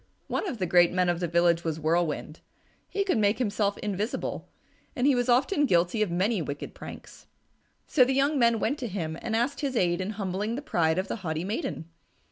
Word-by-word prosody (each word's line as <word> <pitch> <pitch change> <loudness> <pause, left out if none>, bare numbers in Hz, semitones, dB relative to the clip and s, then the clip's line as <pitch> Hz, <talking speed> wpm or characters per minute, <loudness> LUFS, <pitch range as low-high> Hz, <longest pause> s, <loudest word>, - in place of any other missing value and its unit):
One - - -2
of 270 - -4
the 190 - -1
great 175 0 +5
men 180 0 +1
of 175 -1 0
the 175 - -1
village 170 0 +2
was 160 -1 -2
Whirlwind. 160 -1 -1 0.5
He 400 - 0
could 370 - +1
make 205 0 +2
himself 205 -4 0
invisible, 210 +2 -3 0.5
and 250 - 0
he 285 - +5
was 245 0 0
often 285 +5 +3
guilty 175 +2 +2
of 210 - +2
many 190 +4 +1
wicked 145 -1 -5
pranks. - - -11 0.6
So 265 - +4
the 260 +1 +1
young 280 +2 +2
men 235 -2 +4
went 285 +7 -1
to 250 - -3
him 170 -6 -4
and 225 -1 -2
asked 250 +5 0
his 275 -3 -2
aid 175 -1 +1
in 195 +3 -3
humbling 200 +3 -2
the 280 - -5
pride 165 - +1
of 185 - -1
the - - -3
haughty 160 -5 -3
maiden. 205 - -3
200 Hz, 210 wpm, -27 LUFS, 175-245 Hz, 0.6 s, great